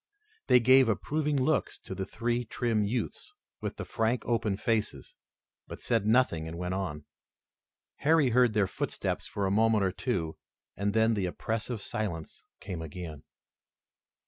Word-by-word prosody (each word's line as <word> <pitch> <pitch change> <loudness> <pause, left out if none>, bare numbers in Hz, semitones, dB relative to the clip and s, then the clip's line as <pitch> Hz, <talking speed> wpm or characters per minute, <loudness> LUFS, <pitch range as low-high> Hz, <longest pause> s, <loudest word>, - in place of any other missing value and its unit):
They 125 - +7
gave 130 +1 +6
approving 150 +7 0
looks 145 +4 +1
to - - -7
the 95 0 -4
three 120 +3 -1
trim 115 -1 0
youths, 110 +3 -3 0.3
with - - -4
the - - -5
frank 115 +2 0
open 110 -4 0
faces, 110 0 -1 0.5
but - - -8
said 115 -4 0
nothing 110 -9 +3
and 80 +1 -6
went 90 +1 -2
on. 80 -6 -3 0.9
Harry 150 -3 +3
heard 125 -1 +4
their 105 -2 +4
footsteps 95 - -3
for 100 - -2
a 95 - +1
moment 110 0 +3
or 95 - +2
two, 90 -7 -2 0.4
and 100 +2 -1
then 110 +1 +4
the 100 -4 0
oppressive 110 +4 -3
silence 85 -7 -4
came 90 -4 -6
again. 80 -1 -7
110 Hz, 150 wpm, -29 LUFS, 95-120 Hz, 0.9 s, They